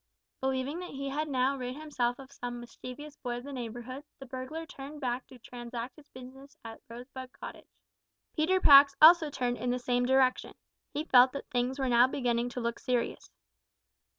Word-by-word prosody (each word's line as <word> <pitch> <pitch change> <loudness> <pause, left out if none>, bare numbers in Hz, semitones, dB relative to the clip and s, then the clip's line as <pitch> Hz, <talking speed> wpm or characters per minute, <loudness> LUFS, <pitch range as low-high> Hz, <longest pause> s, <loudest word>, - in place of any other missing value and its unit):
Believing 265 +4 -1
that 360 - -7
he 275 0 -5
had 300 +3 -2
now 265 0 +1
rid 250 -1 -5
himself 275 -5 -2
of 270 0 -12
some 245 -2 -6
mischievous 255 +5 -10
boy 240 -1 -4
of 245 - -8
the 285 +1 -8
neighbourhood, 245 +2 -6
the 270 - -10
burglar 265 +5 -6
turned 285 0 -9
back 250 -2 -3
to 255 - -14
transact 240 +1 -7
his 300 -2 -18
business 270 +3 -13
at 225 0 -9
Rosebud 250 +2 -9
Cottage. - - -10 0.7
Peter 345 +4 +2
Pax 280 -4 +8
also 320 0 +8
turned 245 -3 -2
in 245 +2 -2
the 250 - +1
same 245 0 0
direction. 260 -1 +2 0.4
He 300 +2 -3
felt 255 -3 +6
that 280 - -7
things 250 +1 0
were 265 -2 -1
now 240 0 +5
beginning 245 -2 -1
to 245 - -5
look 235 0 -2
serious. 245 - -2
255 Hz, 180 wpm, -30 LUFS, 245-280 Hz, 0.7 s, Pax